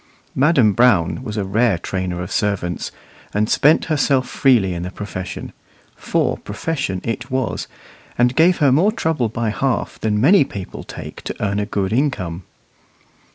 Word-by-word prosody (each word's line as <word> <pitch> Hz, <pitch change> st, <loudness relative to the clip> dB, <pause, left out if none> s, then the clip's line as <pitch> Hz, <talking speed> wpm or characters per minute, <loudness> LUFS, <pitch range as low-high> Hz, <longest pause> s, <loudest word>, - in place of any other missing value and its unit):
Madam 135 Hz, -7 st, +4 dB
Brown 105 Hz, -5 st, +3 dB
was 110 Hz, -4 st, -5 dB
a 105 Hz, -, 0 dB
rare 105 Hz, +1 st, +2 dB
trainer 90 Hz, 0 st, -3 dB
of 90 Hz, -, -8 dB
servants, 95 Hz, -4 st, -1 dB, 0.4 s
and 105 Hz, +1 st, +2 dB
spent 150 Hz, +7 st, +4 dB
herself 145 Hz, -4 st, +1 dB
freely 115 Hz, -9 st, +3 dB
in 85 Hz, -, -4 dB
the 90 Hz, -, -4 dB
profession; 95 Hz, -2 st, -6 dB, 0.4 s
for -, -, 0 dB
profession 135 Hz, -, -3 dB
it 120 Hz, +2 st, -4 dB
was, 130 Hz, -2 st, -2 dB, 0.5 s
and 120 Hz, +1 st, +3 dB
gave 175 Hz, +2 st, +4 dB
her 145 Hz, -5 st, +4 dB
more 170 Hz, +11 st, +4 dB
trouble 160 Hz, -, -1 dB
by 115 Hz, 0 st, -2 dB
half 130 Hz, +2 st, -2 dB
than 105 Hz, -1 st, 0 dB
many 165 Hz, -, +6 dB
people 100 Hz, -8 st, -8 dB
take -, -, -9 dB
to -, -, -5 dB
earn 100 Hz, -1 st, -1 dB
a 105 Hz, -, -2 dB
good 100 Hz, -1 st, -1 dB
income. 95 Hz, -, -1 dB
110 Hz, 155 wpm, -20 LUFS, 95-135 Hz, 0.5 s, many